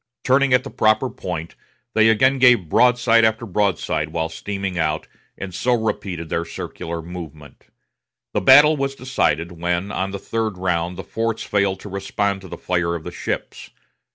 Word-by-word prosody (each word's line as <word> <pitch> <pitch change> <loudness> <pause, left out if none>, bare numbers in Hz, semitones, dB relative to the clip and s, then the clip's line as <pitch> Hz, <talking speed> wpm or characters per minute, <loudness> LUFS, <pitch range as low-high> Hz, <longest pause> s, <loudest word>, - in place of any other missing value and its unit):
Turning 135 +1 +3
at 125 0 +4
the - - -8
proper 110 +4 +2
point, 85 -2 -6 0.4
they 110 0 +5
again 130 +5 +3
gave 120 - +5
broadside 120 0 +4
after 110 +1 +1
broadside 95 -6 -1
while 80 0 -2
steaming 100 +2 -4
out, 80 -2 -1 0.3
and 95 -2 -7
so 125 +7 +1
repeated 100 -7 -3
their 85 +1 -1
circular 85 0 -6
movement. 80 -4 -10 0.7
The - - 0
battle 145 +3 +7
was 135 -1 -2
decided 90 - -1
when, 85 +3 -2
on 95 +1 -2
the 100 - -5
third 110 -1 -3
round, 90 -1 -1
the 95 - -6
forts 115 0 -2
failed 100 -2 0
to 105 - -9
respond 100 0 -2
to 95 - -11
the - - -8
fire 85 -1 -1
of 80 - -6
the 90 - -6
ships. - - -5
100 Hz, 170 wpm, -21 LUFS, 85-115 Hz, 0.7 s, battle